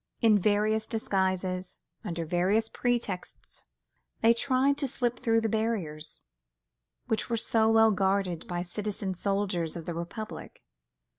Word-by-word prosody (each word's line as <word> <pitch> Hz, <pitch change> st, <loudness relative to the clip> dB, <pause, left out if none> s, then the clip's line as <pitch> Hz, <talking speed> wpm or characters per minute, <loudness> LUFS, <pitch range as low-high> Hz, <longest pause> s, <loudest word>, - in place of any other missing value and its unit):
In 220 Hz, -3 st, +5 dB
various 215 Hz, +2 st, +2 dB
disguises, 185 Hz, -3 st, -1 dB, 0.3 s
under 170 Hz, -5 st, -3 dB
various 190 Hz, +7 st, +1 dB
pretexts, 240 Hz, -7 st, -3 dB, 0.6 s
they 230 Hz, +1 st, +6 dB
tried 265 Hz, +3 st, +2 dB
to 275 Hz, -, +1 dB
slip 245 Hz, -2 st, -1 dB
through 225 Hz, -1 st, +2 dB
the 225 Hz, -, 0 dB
barriers 200 Hz, -9 st, -2 dB, 0.8 s
which 220 Hz, -, -1 dB
were 230 Hz, -, +1 dB
so 220 Hz, 0 st, +2 dB
well 225 Hz, 0 st, +6 dB
guarded 190 Hz, -3 st, 0 dB
by 175 Hz, 0 st, -2 dB
citizen 195 Hz, +1 st, -3 dB
soldiers 190 Hz, -3 st, -1 dB
of 165 Hz, -2 st, -6 dB
the 175 Hz, -, -3 dB
Republic. 175 Hz, +6 st, -7 dB
205 Hz, 130 wpm, -29 LUFS, 180-225 Hz, 0.8 s, they